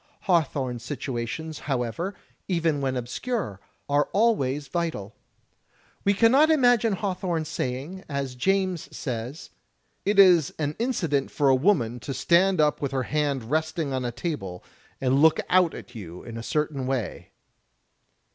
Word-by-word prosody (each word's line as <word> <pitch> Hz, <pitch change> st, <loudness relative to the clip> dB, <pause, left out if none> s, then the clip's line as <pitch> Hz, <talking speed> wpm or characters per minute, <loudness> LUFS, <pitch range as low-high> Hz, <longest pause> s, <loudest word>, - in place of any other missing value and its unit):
Hawthorne's 135 Hz, -, 0 dB
situations, 135 Hz, +4 st, -4 dB
however, 140 Hz, -, -2 dB, 0.3 s
even 165 Hz, -5 st, +1 dB
when 130 Hz, -1 st, -1 dB
obscure, 125 Hz, -, -3 dB, 0.3 s
are 145 Hz, +1 st, +2 dB
always 150 Hz, -, +2 dB
vital. 160 Hz, -, -3 dB, 0.9 s
We 200 Hz, 0 st, +3 dB
cannot 260 Hz, +9 st, +5 dB
imagine 245 Hz, -7 st, +4 dB
Hawthorne 185 Hz, -5 st, -2 dB
saying, 150 Hz, +4 st, -4 dB
as 140 Hz, -2 st, -3 dB
James 185 Hz, +5 st, 0 dB
says, 125 Hz, -, -5 dB, 0.3 s
" -, -, -46 dB, 0.2 s
It 205 Hz, 0 st, +1 dB
is 180 Hz, -7 st, +6 dB
an 150 Hz, -1 st, -2 dB
incident 170 Hz, -, 0 dB
for 145 Hz, -2 st, +2 dB
a 135 Hz, -, +6 dB
woman 130 Hz, -, +2 dB
to 135 Hz, +3 st, -5 dB
stand 185 Hz, +1 st, +3 dB
up 150 Hz, -1 st, +2 dB
with 140 Hz, -2 st, -2 dB
her 130 Hz, -1 st, 0 dB
hand 140 Hz, -4 st, -1 dB
resting 155 Hz, -2 st, -1 dB
on 130 Hz, -1 st, -1 dB
a 120 Hz, -, -2 dB
table 105 Hz, -, -5 dB, 0.4 s
and 135 Hz, +1 st, +2 dB
look 160 Hz, 0 st, +5 dB
out 180 Hz, -2 st, +4 dB
at 125 Hz, -, -10 dB
you 90 Hz, -6 st, -9 dB
in 115 Hz, -, -8 dB
a 115 Hz, -, -5 dB
certain 145 Hz, 0 st, -1 dB
way." 130 Hz, -6 st, -3 dB
150 Hz, 145 wpm, -26 LUFS, 130-180 Hz, 0.9 s, is